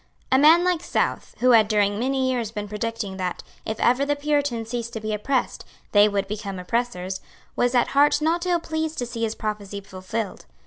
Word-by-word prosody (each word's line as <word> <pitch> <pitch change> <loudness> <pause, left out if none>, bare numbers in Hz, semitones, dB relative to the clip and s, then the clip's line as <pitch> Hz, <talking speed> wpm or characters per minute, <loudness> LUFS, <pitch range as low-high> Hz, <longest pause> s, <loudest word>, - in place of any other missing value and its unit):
A 260 - +5
man 320 +4 +7
like 360 -2 +1
South, - - -2
who 250 0 +5
had 220 -3 +6
during 205 -1 +1
many 260 +1 +1
years 240 -4 -1
been 210 -1 -5
predicting 210 -2 -4
that, 185 -1 -3 0.2
if 220 0 -3
ever 250 +3 +3
the 290 +1 +1
Puritans 285 -6 -1
ceased 235 -1 -4
to 225 - -3
be 215 0 -3
oppressed, 250 +5 -1 0.3
they 205 0 +6
would 200 -1 -1
become 200 -2 -5
oppressors, 190 -2 -2 0.3
was 245 +1 +1
at 245 - +3
heart 290 +2 +4
not 335 +3 0
ill 350 -1 +2
pleased 315 -1 -3
to 245 - -1
see 235 -1 -6
his 220 -1 -1
prophecy 210 -2 -4
fulfilled. 195 +2 -5
230 Hz, 195 wpm, -24 LUFS, 210-275 Hz, 0.3 s, man